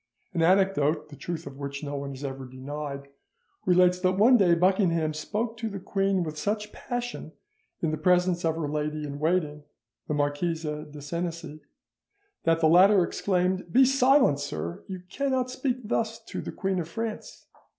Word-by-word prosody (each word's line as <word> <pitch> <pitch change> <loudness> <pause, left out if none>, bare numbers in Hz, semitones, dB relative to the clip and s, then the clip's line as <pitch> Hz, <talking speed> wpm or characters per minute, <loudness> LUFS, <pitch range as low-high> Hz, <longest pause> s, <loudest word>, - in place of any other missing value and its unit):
An 170 - 0
anecdote, 165 -4 +2
the 145 - -10
truth 170 +3 -5
of 140 0 -9
which 140 +1 -5
no 145 0 -4
one 140 0 -4
has 135 0 -8
ever 135 -1 -5
denied, 140 +2 -6 0.6
relates 180 0 +4
that 185 0 +2
one 235 +5 +6
day 185 -7 +5
Buckingham 170 -3 +2
spoke 220 +9 -3
to 225 -1 -3
the 200 -1 -6
queen 195 -1 0
with 155 -1 -5
such 210 +1 -2
passion 245 -9 -5 0.5
in 160 - +1
the 155 - -3
presence 180 +1 +2
of 160 -1 +1
her 160 -2 -2
lady 150 +1 -2
in 145 -1 -5
waiting, 155 -2 0 0.5
the 150 - -1
Marquise 145 +3 -1
de 150 -1 -5
Senecey, 165 0 -5 0.9
that 165 0 +3
the 160 - +5
latter 185 +4 +6
exclaimed, 185 0 -1
"Be 260 +7 +6
silent, 265 - +4
sir, 150 +6 -5
you 185 -2 -7
cannot 260 +4 -1
speak 260 -1 -1
thus 225 +1 -1
to - - -6
the - - -6
Queen 190 -2 -1
of 165 -1 -4
France!" 225 +3 -5
170 Hz, 170 wpm, -27 LUFS, 150-195 Hz, 0.9 s, one